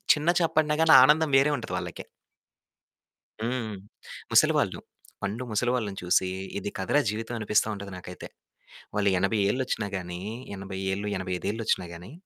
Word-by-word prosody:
చిన్న 150 +3 -1
చేప 165 - +1
పడిన 150 -1 +3
గాని 160 0 +6
ఆనందం 150 +1 +4
వేరే 140 +2 +4
ఉంటది 120 - -6
వాళ్ళకి. - - -6 1.4
హ్మ్. 115 -2 -2 0.6
ముసలివాళ్లు, - - +3 0.4
పండు 110 +6 -3
ముసలివాళ్ళని 110 -2 0
చూసి 90 +1 +2 0.3
ఇది 100 - -3
కథరా 95 +10 +2
జీవితం 110 +3 -4
అనిపిస్తా 105 0 +2
ఉంటది 100 0 -8
నాకైతే. 90 0 -9 0.7
వాళ్ళు 100 -1 +2
80 100 +4 +1
ఏళ్ళొచ్చినా 125 -4 -1
గానీ 90 -1 -5 0.4
80 95 0 -6
ఏళ్ళు, 100 +2 -3
ఎనభై 95 0 -4
ఐదేళ్ళొచ్చినా 105 -1 -1
గానీ 90 +6 -10
105 Hz, 135 wpm, -27 LUFS, 95-125 Hz, 1.4 s, గాని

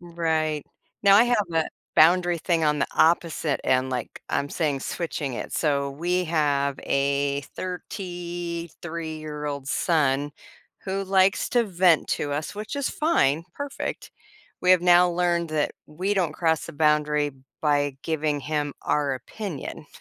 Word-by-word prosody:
Right. 160 -3 -1 0.4
Now 200 0 +7
I 230 - +7
have 240 -5 +2
a 160 -1 +1 0.3
boundary 175 +1 +5
thing 165 -1 +1
on 150 -1 +2
the - - +2
opposite 165 -2 +2
end, 130 0 +2
like, 125 -3 -4
I'm 140 - -1
saying 145 -5 -1
switching 150 -6 -3
it. - - -6
So, 140 -3 0
we 175 +5 -1
have 145 -4 +1
a 140 0 +1
thirty-three-year-old 170 -5 -5
son 145 -3 +1 0.5
who 195 0 -2
likes 190 0 +3
to 240 -1 +3
vent 180 -4 +3
to 145 - -1
us, 150 +6 -3
which 215 +7 -5
is 280 - -1
fine, 165 - +2
perfect. 285 -1 -5 0.5
We 180 - +3
have 185 -2 +6
now 180 0 +6
learned 170 -1 +1
that 155 -1 0
we 185 +7 -2
don't 175 -6 +1
cross 160 -2 0
a - - -7
boundary 150 -1 +2 0.3
by 145 -2 +1
giving 155 -2 -1
him 145 0 -2
our 145 -2 +1
opinion. 155 - -7
160 Hz, 140 wpm, -25 LUFS, 145-180 Hz, 0.5 s, Now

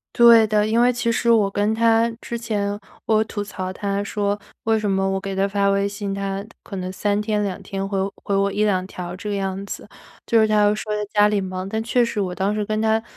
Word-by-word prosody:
对 235 -2 +8
的， 210 0 +2
因 230 +2 +2
为 245 - +5
其 235 -1 0
实 235 +1 0
我 210 -3 +4
跟 205 +2 +1
他 230 0 +3
之 235 - -6
前 205 -3 -2 0.3
我 220 0 +3
吐 205 -1 -4
槽 185 -2 -5
他 200 +1 -2
说， 205 0 -1 0.3
为 225 0 +2
什 210 -1 -1
么 195 0 +1
我 195 0 0
给 195 0 -4
他 195 +1 +2
发 200 0 +1
微 200 0 +2
信， 200 -1 -4
他 195 0 -3 0.2
可 195 - -7
能 185 0 -4
3 205 +2 0
天、 210 -1 0
2 195 -2 -3
天 195 0 -4
回 195 - -2 0.3
回 200 - -1
我 200 0 +2
1-2 200 -3 +1
条 180 -2 -6
这 210 +3 -6
个 205 - -1
样 195 0 -3
子。 - - -7 0.4
就 230 -1 +4
是 220 - +4
他 215 -1 +3
又 205 0 +4
说 215 0 -5
他 210 0 -2
家 210 0 +5
里 210 -1 +1
忙， 185 0 -4
但 220 +2 -2
确 240 +1 +2
实 230 -2 -2
我 185 -3 -1
当 190 +3 0
时 210 -1 -1
跟 215 +1 -1
他 220 0 +2
205 Hz, 250 characters per minute, -22 LUFS, 195-220 Hz, 0.4 s, 对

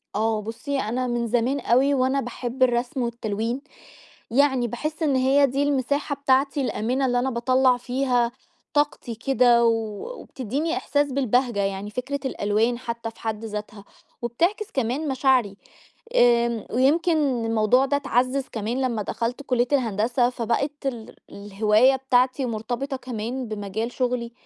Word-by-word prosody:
آه 220 0 +1
بُصي 250 +6 -4
أنا 250 +3 -1
من 240 -1 -1
زمان 245 +4 +1
أوي 265 +4 +3
وأنا 265 +1 +1
باحب 245 +1 -2
الرسم 245 +1 +1
والتلوين، 235 +1 -2 0.7
يعني 265 -2 +3
باحس 305 +8 -4
إن 280 -3 +2
هي 270 +2 +4
دي 275 +3 0
المساحة 285 +1 0
بتاعتي 275 0 +1
الآمنة 255 +2 -1
اللي 245 -1 +1
أنا 265 +2 0
باطلّع 255 +1 +3
فيها 245 -1 0 0.4
طاقتي 290 -5 0
كده 240 -1 +3
و 230 - +5 0.5
وبتديني 275 +7 -3
إحساس 285 -1 0
بالبهجة 250 -4 +1
يعني 195 +1 -2
فكرة 265 +5 -4
الألوان 225 +1 0
حتى 235 -2 -5
في - - -23
حد 220 0 -3
ذاتها، 210 -1 -6 0.4
وبتعكس 345 - -1
كمان 265 +4 -1
مشاعري. 255 -7 +2 0.6
آمم، 235 -2 +3
ويمكن 280 -2 +2
الموضوع 225 +4 +3
ده 285 +1 +1
اتعزز 255 0 0
كمان 230 +4 -2
لما 235 -5 -1
دخلت 235 +6 -3
كلية 245 -2 +1
الهندسة 240 0 +1
فبقت 255 +5 -2
ال 240 -5 -4 0.2
الهواية 210 +5 +3
بتاعتي 260 0 +1
مرتبطة 240 +5 -3
كمان 245 0 -5
بمجال 215 +2 -4
شغلي. 245 -2 -2
245 Hz, 135 wpm, -24 LUFS, 230-270 Hz, 0.7 s, و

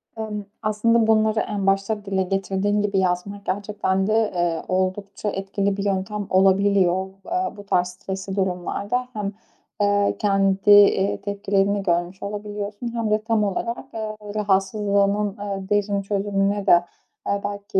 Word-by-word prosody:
Emm, 215 -2 -4 0.2
aslında 220 +1 +2
bunları 220 0 +3
en 200 -2 -2
başta 195 +2 0
dile 195 -1 0
getirdiğin 195 +2 0
gibi 200 -1 +1
yazmak 190 +2 -1
gerçekten 195 -1 -1
de, 220 0 +2
eee, 175 -2 0
oldukça 195 +2 -2
etkili 195 0 -2
bir 200 - -3
yöntem 200 +1 -2
olabiliyor. 190 -1 +3 0.2
Eee, 360 -7 -2
bu 205 - -10
tarz 180 -2 +2
stresli 190 +1 -6
durumlarda 200 +6 -1
hem, 205 -3 -3 0.5
eee, 205 0 +2
kendi, 195 -1 +2
eee, 200 -1 +5
tepkilerini 200 0 0
görmüş 175 +1 -1
olabiliyorsun 205 +2 -5
hem 230 -2 -1
de 215 0 +2
tam 225 -1 +1
olarak, 230 +5 -2
eee, 215 -1 -4 0.2
rahatsızlığının, 200 0 +1
eee, 195 -1 -5
derin 205 -1 +1
çözümüne 200 0 -1
de, 175 -2 +6 0.4
eee, 200 0 0
belki, 200 0 -2
200 Hz, 140 wpm, -23 LUFS, 195-210 Hz, 0.5 s, de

